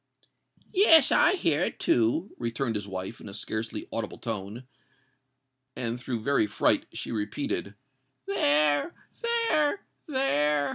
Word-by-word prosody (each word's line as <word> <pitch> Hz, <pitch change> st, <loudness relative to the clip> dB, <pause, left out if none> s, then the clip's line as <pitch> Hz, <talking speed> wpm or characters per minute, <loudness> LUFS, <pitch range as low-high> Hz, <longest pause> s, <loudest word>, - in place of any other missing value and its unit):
"Yes—I 340 Hz, -3 st, +6 dB
hear 160 Hz, -, +1 dB
it -, -, -2 dB
too!" 120 Hz, -, +1 dB
returned 115 Hz, +1 st, -2 dB
his 105 Hz, -2 st, -4 dB
wife, 95 Hz, +3 st, -6 dB
in 105 Hz, -, -9 dB
a 100 Hz, -, -8 dB
scarcely 110 Hz, +1 st, -4 dB
audible 115 Hz, -2 st, -4 dB
tone: 110 Hz, +2 st, -5 dB, 1.1 s
and, 120 Hz, 0 st, -3 dB
through 120 Hz, -3 st, -4 dB
very 140 Hz, -4 st, +2 dB
fright, 100 Hz, -, +1 dB
she -, -, -6 dB
repeated, 105 Hz, -1 st, -3 dB, 0.5 s
"There—there—there!" 300 Hz, -, +1 dB
120 Hz, 105 wpm, -27 LUFS, -, 1.1 s, Yes—I